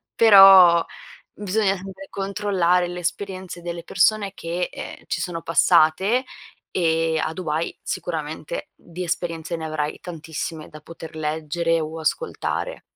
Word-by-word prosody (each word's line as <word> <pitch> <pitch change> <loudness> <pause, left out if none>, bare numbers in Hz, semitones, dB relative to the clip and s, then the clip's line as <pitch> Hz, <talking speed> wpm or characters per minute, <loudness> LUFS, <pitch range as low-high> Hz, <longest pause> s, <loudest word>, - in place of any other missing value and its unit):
però, 195 -6 +8 0.5
bisogna 200 -1 -1 0.3
controllare 195 -3 0
le 180 0 -6
esperienze 185 0 -5
delle 170 0 -5
persone, 200 +2 +2
che, 175 +1 -3
ehm, - - -9
ci - - -2
sono 175 -2 -4
passate 170 - +3 0.5
e 165 -2 +1
a 155 - -2
Dubai, 160 -2 -3
sicuramente, 160 - -5
di 175 +1 -9
esperienze 170 -1 -3
ne 160 - -6
avrai 155 -1 -3
tantissime 160 -2 -6
da 155 - -12
poter 165 0 -11
leggere 160 +2 -1
o 160 +1 -5
ascoltare. 485 - -3
170 Hz, 120 wpm, -22 LUFS, 160-190 Hz, 0.5 s, però